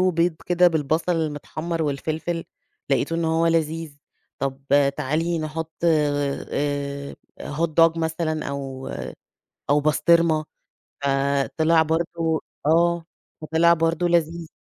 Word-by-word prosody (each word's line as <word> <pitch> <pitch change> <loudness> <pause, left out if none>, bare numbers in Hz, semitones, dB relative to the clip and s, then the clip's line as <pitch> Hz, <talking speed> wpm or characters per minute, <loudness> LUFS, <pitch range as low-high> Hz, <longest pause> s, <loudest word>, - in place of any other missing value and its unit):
بيض 170 0 +2
كده 180 0 +5
بالبصل 160 +2 0
المتحمَّر 160 +2 -3
والفلفل، 155 +3 -2 0.5
لقيت 135 +4 +1
إن 165 0 0
هو 160 +1 +2
لذيذ. 165 -2 -1 0.4
طب 135 0 -3
آآ، 140 -1 +5
تعالي 155 +4 -1
نحط 160 +1 -4
آآ، 145 -2 -1 0.3
Hot 160 +3 -1
dog 165 0 +5
مثلًا 160 -1 -2
أو 135 -1 -5 0.8
أو 145 +1 +4
بسطرمة. 155 +1 +3 0.6
فطلع 140 +4 +2
برضه 160 0 -1 0.2
آه. 170 +2 +3 0.4
فطلع 160 +2 +4
برضه 165 +1 +1
لذيذ. 170 -1 0
160 Hz, 105 wpm, -23 LUFS, 145-165 Hz, 0.8 s, كده